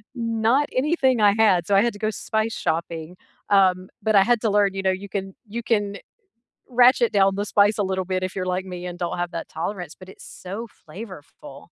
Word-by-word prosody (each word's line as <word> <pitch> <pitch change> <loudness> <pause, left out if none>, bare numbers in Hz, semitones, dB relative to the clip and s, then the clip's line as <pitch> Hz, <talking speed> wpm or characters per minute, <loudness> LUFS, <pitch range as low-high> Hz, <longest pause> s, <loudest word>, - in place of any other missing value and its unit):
not 230 +4 +1 0.2
anything 275 -5 +2
I 205 -1 +5
had, 190 -5 +5
so - - 0
I - - +6
had 235 - 0
to 205 - -12
go 215 - +2
spice 220 +1 -2
shopping, 165 0 -2 0.5
um, 185 -2 +4 0.3
but 215 -1 +2
I - - +5
had 235 - +3
to 220 - +1
learn, 205 -1 +3
you 195 - -3
know, - - +4
you 200 - -9
can 195 - -1 0.3
you 235 - -3
can 205 -2 +3 1.0
ratchet 245 -1 +5
down 195 0 +5
the 205 - -1
spice 205 +1 +4
a 205 - +1
little 190 0 -1
bit 185 - 0
if 185 - -9
you're 185 -1 -2
like 185 +1 -3
me 175 - -7
and 175 - -7
don't 175 0 -3
have 175 0 -4
that 165 - -5
tolerance, 175 -1 -4
but 185 - -13
it's - - -15 0.2
so 185 +1 -5 0.3
flavorful. 185 -2 -11
200 Hz, 220 wpm, -23 LUFS, 185-220 Hz, 1.0 s, I